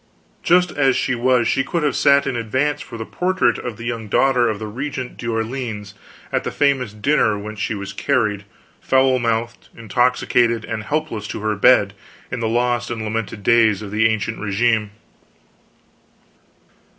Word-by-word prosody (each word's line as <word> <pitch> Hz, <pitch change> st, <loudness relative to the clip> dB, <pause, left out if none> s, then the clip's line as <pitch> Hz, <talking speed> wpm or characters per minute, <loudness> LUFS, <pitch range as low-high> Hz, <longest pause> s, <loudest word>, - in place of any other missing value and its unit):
Just 180 Hz, 0 st, +3 dB
as 135 Hz, -3 st, +2 dB
she -, -, 0 dB
was 120 Hz, 0 st, +2 dB
she 135 Hz, -, +1 dB
could 165 Hz, +3 st, -2 dB
have 145 Hz, -3 st, +1 dB
sat 140 Hz, 0 st, +4 dB
in 130 Hz, -, -2 dB
advance 130 Hz, +6 st, -1 dB
for 115 Hz, -, -9 dB
the 110 Hz, -, -5 dB
portrait 185 Hz, +6 st, 0 dB
of 120 Hz, -4 st, -6 dB
the 115 Hz, -, -8 dB
young 115 Hz, -2 st, -4 dB
daughter 125 Hz, +2 st, +3 dB
of 110 Hz, -, -2 dB
the 110 Hz, -, -6 dB
Regent 130 Hz, +3 st, -5 dB
d'Orleans, 115 Hz, -3 st, -4 dB, 0.4 s
at -, -, 0 dB
the -, -, -2 dB
famous 135 Hz, -6 st, +1 dB
dinner 110 Hz, -1 st, +1 dB
whence 105 Hz, +1 st, -7 dB
she 105 Hz, -, -2 dB
was 100 Hz, 0 st, -6 dB
carried, 105 Hz, -4 st, 0 dB, 0.4 s
foul 130 Hz, -1 st, +3 dB
mouthed, 115 Hz, 0 st, -2 dB
intoxicated, 115 Hz, 0 st, +1 dB
and 110 Hz, -1 st, -5 dB
helpless, 145 Hz, -8 st, -3 dB
to -, -, -6 dB
her 110 Hz, 0 st, 0 dB
bed, 100 Hz, -1 st, +4 dB, 0.4 s
in 125 Hz, -, -3 dB
the 115 Hz, -1 st, -1 dB
lost 120 Hz, +1 st, 0 dB
and 115 Hz, -2 st, -4 dB
lamented 110 Hz, -1 st, -4 dB
days 110 Hz, -2 st, +3 dB
of 100 Hz, -, -8 dB
the 110 Hz, +1 st, +3 dB
Ancient 110 Hz, -1 st, -2 dB
Regime. 110 Hz, +1 st, +1 dB
115 Hz, 165 wpm, -20 LUFS, 110-130 Hz, 0.4 s, sat